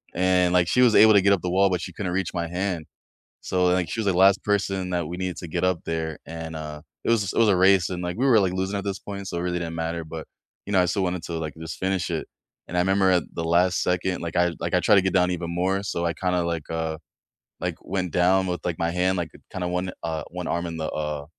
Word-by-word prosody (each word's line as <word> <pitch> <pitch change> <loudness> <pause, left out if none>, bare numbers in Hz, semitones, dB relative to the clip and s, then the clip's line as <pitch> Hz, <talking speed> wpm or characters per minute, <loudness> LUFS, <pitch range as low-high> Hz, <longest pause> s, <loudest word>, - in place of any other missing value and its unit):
and, 90 0 +3
like, 90 -1 +4
she 125 - +3
was 120 -3 +5
able 110 0 +8
to 100 - +6
get 100 +1 +4
up 95 - 0
the 90 - -2
wall, 95 +2 +4
but 90 -2 -1
she 90 - -6
couldn't 90 0 -3
reach 95 -1 -1
my 85 -2 -2
hand, 90 -1 -2 0.6
so, 90 -1 0
like, 90 -2 +1
she 115 - -3
was 105 - -2
the 95 - +3
last 95 +1 +5
person 95 -2 0
that 85 -3 -1
we 85 - -5
needed 90 -1 -3
to 85 - -7
get 80 - -2
up 90 -2 +1
there, 80 -1 -3
and, 80 0 -7
uh, 75 -1 -6 0.2
it - - 0
was 105 -5 +1
it - - -5
was 115 -2 +5
a 100 - +4
race, 95 -1 +4
and, 90 -1 -4
like, 90 +1 -3
we 130 - +1
were, 120 -5 +6
like, 95 -2 0
losing 95 +2 -2
at 100 - -4
this 100 -1 -3
point, 100 -1 -7
so 85 - -4
it - - -2
really 90 0 -1
didn't 85 -1 -4
matter, 80 0 -3
but, 80 0 -7 0.4
you 105 - -4
know, 95 - +5
I - - +3
still 95 +2 0
wanted 90 -1 -2
to, 85 - -6
like, 80 -1 -4
just 80 0 -7
finish 95 -1 -1
it, 80 - -3 0.4
and 90 - -4
I - - +4
remember 95 +1 +3
at 90 -2 +3
the 85 - -2
last 90 +2 +3
second, 90 0 -1
like, 85 -1 -4
I 90 -1 +3
like, 85 +2 -3
I 90 - +3
try 105 - +5
to 100 - +6
get 95 - 0
down 90 -1 +3
even 85 -1 -3
more, 95 +3 0
so, 85 -3 -2
I 85 - 0
kinda, 90 -1 0
like, 85 -3 -3
uh, 80 -1 -2 0.6
like, - - -2
went 90 -2 -3
down 95 +2 +3
with, 90 -1 -2
like, 85 -3 -1
my 85 0 0
hand, 90 +2 +1
like, 85 -2 -2 0.2
kinda 90 -1 -3
1, 90 +1 -2
uh, 80 -2 -2
1 90 0 -5
arm 85 +1 -1
in 85 - -5
the 80 -1 -3
uh, 75 -1 -3
90 Hz, 285 wpm, -25 LUFS, 85-95 Hz, 0.6 s, able